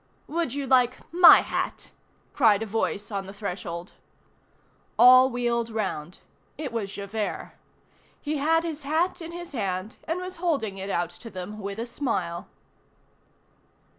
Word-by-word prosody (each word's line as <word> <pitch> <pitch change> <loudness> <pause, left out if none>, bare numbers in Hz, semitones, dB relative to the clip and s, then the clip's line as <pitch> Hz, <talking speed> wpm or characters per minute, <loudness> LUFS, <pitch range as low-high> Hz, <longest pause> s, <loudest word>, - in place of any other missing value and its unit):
—" - - -37
"Would 325 -5 -2
you 285 -1 -2
like 255 -1 +3 0.2
my 350 0 +9
hat?" - - -4 0.4
cried 225 -5 +4
a - - -3
voice 210 -1 -2
on 195 -2 -3
the 195 - -8
threshold. 180 -3 -6 1.0
All 255 +1 +8
wheeled 240 -2 -1
round. 190 -7 -4 0.4
It 280 -6 -5
was 210 -4 -3
Javert. 205 +1 -4 0.7
He 305 0 -2
had 325 +3 +2
his 320 -3 -4
hat 320 +6 0
in 330 0 -7
his 345 0 -8
hand, 200 -2 -3
and 330 +3 -1
was 365 0 -7
holding 275 - -1
it 195 +1 -5
out 175 -2 -1
to 230 +6 -10
them 195 +2 -7
with 200 0 -5
a 230 - -3
smile. 190 -10 -3
230 Hz, 150 wpm, -26 LUFS, 200-290 Hz, 1.0 s, my